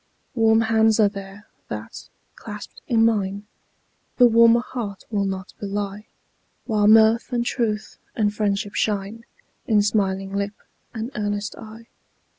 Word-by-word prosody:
Warm 225 -1 +4
hands 220 0 +3
are 210 - +6
there, 200 0 -10 0.2
that, - - -8 0.2
clasped 210 -2 -10
in 225 -2 +3
mine, 205 -2 0 0.7
The 245 - +7
warmer 230 0 +6
heart 225 -6 -6
will 200 -2 0
not 190 -1 -5
belie; 205 +1 -4 0.6
While 210 -3 +2
mirth 220 +3 +5
and 240 -1 0
truth, 215 -4 -2 0.2
and 210 -2 +1
friendship 205 -1 -1
shine 210 +2 -2 0.4
In 210 -2 +4
smiling 195 -2 0
lip 200 +1 -2 0.4
and 230 +2 -5
earnest 205 0 -3
eye. 225 +1 -11
210 Hz, 130 wpm, -23 LUFS, 200-225 Hz, 0.7 s, The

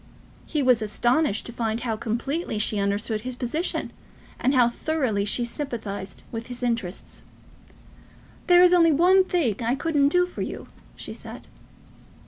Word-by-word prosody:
He 300 -3 -1
was 250 -3 +4
astonished 240 +3 +1
to 235 - -7
find 230 -1 -2
how 230 -2 -1
completely 235 +6 -3
she 210 0 +2
understood 205 +2 -1
his 255 +2 -5
position, 275 +8 -3 0.5
and 265 +2 +1
how 245 -2 +5
thoroughly 240 -6 -1
she 240 +3 0
sympathised 220 - -5
with 230 0 -6
his 245 0 -6
interests. 230 -7 -3 1.3
"There 355 -1 +7
is 360 0 +6
only 335 -2 +5
one 360 +5 +5
thing 325 - 0
I 235 +3 +1
couldn't 290 -1 +2
do 360 +3 +3
for 360 - -8
you," - - -5 0.3
she - - -7
said. - - -10
245 Hz, 150 wpm, -24 LUFS, 220-315 Hz, 1.3 s, There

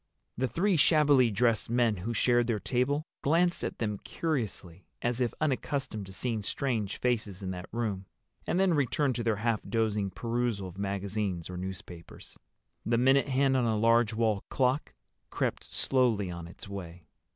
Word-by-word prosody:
The 130 +2 0
three 185 +6 +1
shabbily 145 -5 +5
dressed 115 +1 +1
men 120 -3 +2
who 100 +6 -3
shared 120 0 +3
their 115 -3 0
table 140 +7 0 0.2
glanced 170 +4 +2
at - - -3
them 105 -3 -2
curiously, 100 - -4 0.2
as 120 +1 0
if 120 - +1
unaccustomed 135 -7 -2
to - - -9
seeing 110 +2 -2
strange 110 -2 -2
faces 110 -6 -1
in 95 - -3
that 90 -1 -7
room, 105 -5 -2 0.4
and 175 - +1
then 190 -2 +4
returned 145 -1 +1
to 120 - -2
their 115 -2 +2
half 110 +1 0
dozing 105 -3 0
perusal 115 -1 -2
of 90 +2 -10
magazines 100 -3 -2
or - - -6
newspapers. 90 -2 -8 0.5
The 115 0 +1
minute 135 +3 +4
hand 135 0 +2
on 125 -2 +2
a 110 -2 +1
large 115 +1 +4
wall 110 -3 0
clock 130 +2 0 0.3
crept - - -2
slowly 115 -8 +1
on 85 -1 -7
its 85 - -11
way. 90 -4 -8
115 Hz, 165 wpm, -30 LUFS, 100-130 Hz, 0.5 s, shabbily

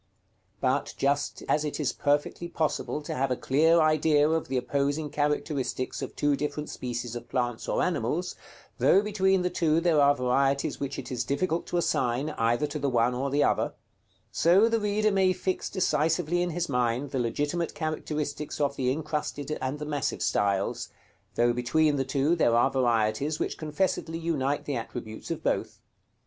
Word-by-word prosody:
But - - 0
just 140 +1 0
as 150 - +2
it 150 0 -3
is 150 - 0
perfectly 145 +4 0
possible 155 -2 -2
to - - -4
have 135 +1 0
a 125 - +1
clear 160 +7 +3
idea 155 -1 +4
of 160 0 0
the 130 - -1
opposing 140 +4 -1
characteristics 145 -3 -1
of - - -6
two 145 -1 +2
different 150 +1 -4
species 120 -1 -4
of 120 0 -7
plants 120 -3 -2
or - - +1
animals, - - -1 0.4
though 195 - +5
between 190 -3 +2
the 180 - 0
two 160 -1 +2
there 165 -3 +3
are 140 0 +5
varieties 135 +2 +1
which 140 -1 -4
it 135 - -7
is 125 -2 -1
difficult 165 +6 -1
to 175 - -1
assign 140 -3 0
either 120 +3 +1
to 150 +1 -4
the 140 0 0
one 120 0 +2
or 135 +3 -2
the 145 +2 +2
other, - - +1 0.6
so 185 +7 +4
the 230 0 +1
reader 210 +1 +1
may 190 -1 +3
fix 185 +1 -2
decisively 170 -1 +1
in 175 - 0
his 175 +1 -2
mind 125 +1 0
the 135 - -1
legitimate 145 +8 -1
characteristics 150 -2 -3
of 140 -1 +1
the 125 -2 +1
incrusted 150 0 -3
and 130 +2 -2
the 150 - -5
massive 145 -4 -2
styles, 100 -1 0 0.5
though 120 0 +3
between 145 +5 +2
the 135 - +1
two 140 +4 +1
there 120 -8 +3
are 120 +3 +4
varieties 120 +3 +1
which - - -2
confessedly 165 +1 -1
unite 145 -4 -1
the 145 - -2
attributes 110 -1 -6
of - - -4
both. - - -1
145 Hz, 175 wpm, -27 LUFS, 130-160 Hz, 0.6 s, though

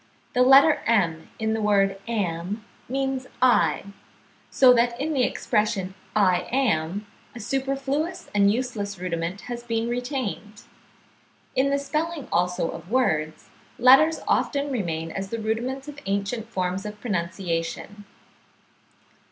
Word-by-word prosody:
The 250 - +2
letter 270 +4 +7
m 175 -8 +1
in 220 0 -1
the 220 - -1
word 195 -2 +2
am, 200 -1 -2 0.2
means 265 0 -2
I; 240 -11 +3 0.7
so 255 -2 +6
that 235 0 +1
in 310 +3 -1
the 270 - +1
expression 205 -5 0 0.2
I 185 -4 +3
am, 205 -7 0 0.3
a - - -7
superfluous 275 - -2
and 200 -1 +4
useless 215 -4 -3
rudiment 175 +1 -3
has 240 -1 -6
been 230 -1 -2
retained. 245 -4 -4 0.9
In 270 +2 +3
the 280 - +2
spelling 305 +2 -3
also 180 -1 +1
of 175 - -10
words, 160 -11 0 0.3
letters 270 +6 +6
often 285 -1 +1
remain 165 -9 -2
as 195 +2 -5
the 230 - -3
rudiments 240 +5 -3
of 290 -1 -8
ancient 200 +3 -2
forms 185 -2 -2
of 210 0 -7
pronunciation. 180 0 -3
220 Hz, 125 wpm, -25 LUFS, 190-260 Hz, 0.9 s, letter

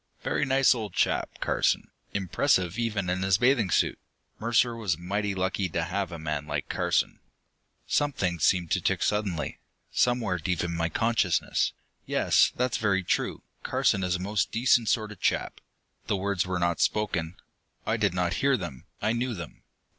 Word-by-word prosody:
Very - - 0
nice 135 0 +4
old 110 -6 -5
chap, - - +1
Carson, - - +1 0.2
impressive 95 0 +1
even 105 -5 -1
in 90 +1 -1
his 95 -1 +3
bathing 120 -4 +3
suit. - - +1 0.4
Mercer 115 +1 +2
was 100 -8 -1
mighty 100 +3 -2
lucky 95 0 -1
to 85 0 -1
have 95 +1 -2
a 85 - -5
man 75 -2 -3
like 75 -1 -3
Carson.... - - 0 0.7
Something 100 - 0
seemed 85 +1 +2
to - - +2
tick - - 0
suddenly, 100 -7 -1 0.3
somewhere 120 -8 +1
deep 90 -1 -1
in 85 0 -2
my 85 0 0
consciousness. 100 -3 +1 0.3
"Yes, - - +3
that's 125 0 0
very 100 -3 +1
true: - - -1 0.2
Carson 95 - +1
is 90 -1 +1
a - - -3
most 100 +1 -1
decent 120 -1 +3
sort 110 -3 0
of 105 - -11
chap." - - -1 0.5
The 100 - +1
words 95 -2 -1
were 90 -1 -1
not 85 -2 0
spoken. 95 -6 0 0.5
I 110 - +1
did 105 -5 +1
not 90 -1 0
hear 135 -1 +3
them, 85 - -7 0.2
I 110 - +2
knew 120 0 -1
them. 85 -4 -9
95 Hz, 170 wpm, -27 LUFS, 90-110 Hz, 0.7 s, nice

